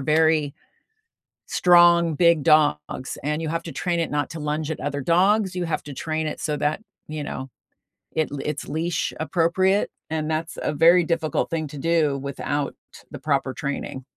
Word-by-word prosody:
very 155 0 +2 0.9
strong, 175 -2 +5
big 170 -1 +4
dogs, 130 - +2
and 150 +2 -1
you 160 - -3
have 165 +1 -2
to 165 - -6
train 175 -1 -1
it 165 - -2
not 145 -2 -1
to 160 -1 -7
lunge 150 +1 -2
at - - -7
other 145 0 -3
dogs, 190 +6 +2
you 180 - -1
have 165 - -2
to 145 -2 -8
train 155 +2 -2
it - - -4
so 150 -2 -1
that, 155 +8 -1 0.2
you 155 -1 -5
know, 130 -2 -5 0.6
it 155 - 0 0.2
it's 150 -1 -4
leash 160 +2 -2
appropriate, 185 +4 +2 0.2
and 155 -1 -2
that's 160 +1 -3
a 150 - -1
very 170 +4 +6
difficult 165 -2 -1
thing 160 -2 -2
to 145 - -9
do 155 -2 +1
without 140 +1 -3 0.4
the - - -7
proper 140 -2 0
training. 140 -2 -4
155 Hz, 175 wpm, -23 LUFS, 145-170 Hz, 0.9 s, very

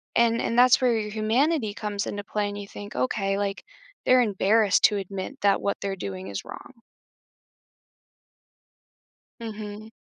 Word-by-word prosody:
and 235 0 +3
and 230 - -1
that's 255 +1 +6
where 245 -3 +3
your 210 0 -4
humanity 225 +3 +1
comes 205 -1 -3
into 205 0 -4
play, 205 0 -2
and 205 - -6
you 205 -1 -7
think, 205 +1 -9
"Okay, 195 +10 0
like, 200 -1 -2 0.4
they're 255 0 +6
embarrassed 210 -1 +3
to 210 - +3
admit 195 +7 -6
that 200 -1 +3
what 200 - -1
they're 195 -1 -2
doing 95 - -6
is 100 -1 -5
wrong." 245 -3 -11 2.6
Mhm. 215 -1 -7
210 Hz, 150 wpm, -25 LUFS, 200-230 Hz, 2.6 s, that's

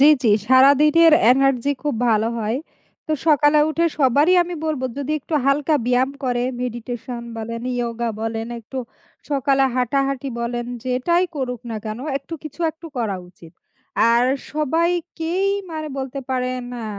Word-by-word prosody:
জি, 280 - +8 0.2
জি। 230 - +3 0.2
সারাদিনের 285 +6 +6 0.2
এনার্জি 270 0 +2
খুব 295 -4 -1
ভালো 220 0 +2
হয়। 220 +2 -1 0.5
তো 310 - -1
সকালে 295 -1 +5
উঠে 335 +2 +1
সবারই 290 +6 +4
আমি 350 0 -6
বলব 305 -4 -2 0.2
যদি 285 +1 -2
একটু 315 - -5
হালকা 290 +3 +2
ব্যায়াম 250 +2 +2
করে, 245 -1 0 0.2
মেডিটেশন 240 0 -5
বলেন, 230 +1 -5
ইয়োগা 235 -1 -2
বলেন 225 0 -3
একটু 245 +4 -7 0.5
সকালে 275 -1 +2
হাঁটাহাঁটি 275 +2 0
বলেন, 240 0 -3 0.2
যেটাই 260 +8 +1
করুক 250 -4 -3
না 225 - -3
কেন 215 +1 -4 0.2
একটু 280 +4 -8
কিছু 310 +2 -10
একটু 325 +1 -13
করা 220 -5 -1
উচিত। 170 -2 -16 0.6
আর 235 +1 +4 0.3
সবাইকেই 335 +4 0 0.2
মারে 310 -1 -4
বলতে 270 +1 -4
পারেন, 255 0 -1 0.2
আ - - -5
265 Hz, 145 wpm, -21 LUFS, 240-300 Hz, 0.6 s, জি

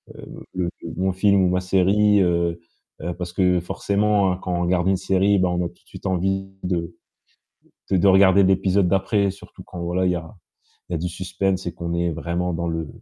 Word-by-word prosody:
heu, - - -11
le-le 90 -2 -1 0.3
mon 95 +1 +1
film 100 0 +3
ou 90 - +3
ma 90 0 0
série, 100 +2 +3
heu 85 -1 +1 0.4
heu, 90 - -3
parce 90 -1 -6
que 90 -2 +2
forcément, 100 +2 +1
hein, 90 - -3
quand 90 - -3
on 85 - -1
regarde 90 0 +1
une 95 0 +3
série, 95 +1 +2
bah, 90 -1 +2
on 90 - -1
a - - -1
tout - - -21
de - - -32
suite - - -12
envie 95 +1 -1
de 85 -2 -2 1.0
de 95 - +4
de 90 - +3
regarder 95 0 +6
l'épisode 95 0 +2
d'après. 100 +1 +1
Surtout 100 - -14
quand 90 -2 -8
voilà, 90 +2 -1
il 90 - +2
y - - -1
a 85 +5 -7 0.5
il - - -4
y - - 0
a - - 0
du 90 +1 -2
suspense 95 +1 -2
et - - -3
qu'on 85 0 -5
est 85 0 0
vraiment 85 +2 -2
dans 85 +1 -2
le 80 -1 -3
90 Hz, 220 wpm, -22 LUFS, 85-95 Hz, 1.0 s, regarder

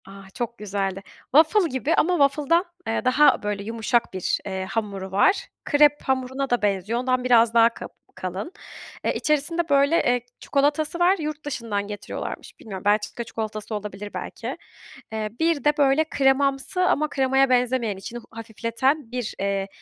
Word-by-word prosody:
Ah, 195 0 -12
çok 240 -1 -4
güzeldi. 195 -2 -3 0.3
Waffle 330 +4 +5
gibi 270 +5 0
ama 350 - +2 0.2
waffle'dan, 305 +5 +1 0.2
eee, 225 - -1
daha 255 +1 +4
böyle 205 -1 -2
yumuşak 230 +1 0
bir, 185 -1 -1
eee, 190 -1 -3
hamuru 195 -2 -4
var. 385 - +3 0.2
Krep 295 0 +4
hamuruna 265 +1 -1
da 245 - +1
benziyor. 205 +3 0
Ondan 255 0 0
biraz 235 -2 +4
daha 230 0 +6
ka - - -8 0.3
kalın. 185 - -5 0.5
Eee, - - +2
içerisinde, 310 +3 0
böyle, 280 -3 +3 0.2
çikolatası 295 +4 0
var. 360 +3 +4
Yurt 305 -1 -5
dışından 225 -8 -3
getiriyorlarmış. 205 -1 -7
Bilmiyorum, 195 -3 -8
Belçika 210 +3 +1
çikolatası 220 -1 -5
olabilir 205 0 -6
belki. - - -6 0.5
Eee, 215 -1 -3
bir 325 -2 +1
de, 295 0 +2
böyle, 285 +1 +4
kremamsı 270 +4 +1
ama 305 -4 +2
kremaya 270 0 +2
benzemeyen 245 -4 +1
içini 230 +5 -7
a 225 - -15
hafifleten 230 +4 -1
bir, 245 -3 -3
eee, 195 0 -1
245 Hz, 150 wpm, -24 LUFS, 210-285 Hz, 0.5 s, daha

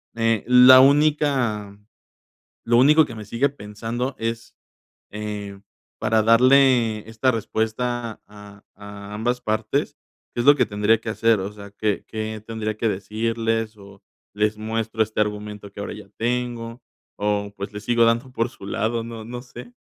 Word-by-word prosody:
Eh, 115 -2 +1
la 125 +1 +9
única 135 -8 +2 0.9
lo 120 0 +3
único 150 +5 +6
que 120 - -9
me 110 - -8
sigue 115 +6 +1
pensando 120 +1 -5
es, 115 0 -4 0.6
eh, 105 -1 -6 0.4
para 110 0 +2
darle 120 -2 +4
esta 115 +4 +1
respuesta 115 +1 -3
a 105 -1 -14
a 100 0 -10
ambas 120 +3 -1
partes, 110 +7 -2 0.4
¿qué 120 - 0
es - - -4
lo 145 - +9
que 125 -3 +2
tendría 105 +1 +2
que 115 - -5
hacer? 115 0 +2
O 95 +2 -4
sea, 100 -1 -11
¿qué 105 0 -2
qué 110 0 -5
tendría 110 -1 -4
que 115 - 0
decirles 115 +2 -2
o 100 -1 -15 0.3
les 105 +1 0
muestro 110 0 -2
este 110 0 -6
argumento 105 -1 -4
que 100 - -12
ahora - - -5
ya 105 -1 -11
tengo, 120 0 -3 0.4
o 100 0 -1
pues, 100 +2 -6
le 105 - -5
sigo 115 +1 +3
dando 115 +3 +1
por 115 -1 -1
su 100 - -13
lado? 115 +3 -1
No 115 -1 -8
no 120 +1 -7
sé. 130 - -12
115 Hz, 160 wpm, -22 LUFS, 105-120 Hz, 0.9 s, la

